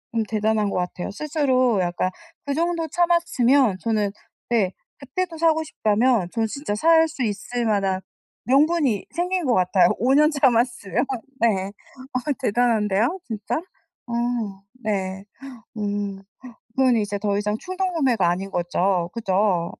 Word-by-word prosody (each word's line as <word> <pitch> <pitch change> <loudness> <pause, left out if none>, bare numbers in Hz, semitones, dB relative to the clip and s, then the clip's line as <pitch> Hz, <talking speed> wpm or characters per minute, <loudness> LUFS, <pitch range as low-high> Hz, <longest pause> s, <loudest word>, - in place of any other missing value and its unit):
음 225 - +2
대단한 215 -1 +1
것 200 - -2
같아요. 180 +1 -3
스스로 260 - +1
약간 175 +1 0 0.4
그 285 - -1
정도 335 +1 0
참았으면 285 - +2
저는 215 -2 0 0.4
네 210 -6 +2 0.3
그때도 325 +5 -4
사고 320 -1 +3
싶다면 220 - +1
저는 225 -2 0
진짜 275 -2 -4
살 325 +6 +5
수 305 -5 -4
있을 230 +3 -2
만한 195 -3 +1 0.4
명분이 275 - +2
생긴 360 0 0
것 250 - +2
같아요. 185 0 +4
5 255 +4 +3
년 300 +2 +5
참았으면. 245 - +1 0.3
네. 195 -5 +2 0.5
어 255 - +1 0.2
대단한데요 225 - +1
진짜. 215 -3 -3 0.5
어 235 - -5 0.7
네. 195 -2 -2 0.5
음. 205 -1 -3 0.5
그건 260 -2 +4
이제 205 -2 -1
더 200 0 0
이상 210 +1 -1
충동구매가 330 - 0
아닌 190 +3 -2
거죠? 175 0 0
그죠? 195 -5 +1
225 Hz, 260 characters per minute, -23 LUFS, 200-285 Hz, 0.7 s, 살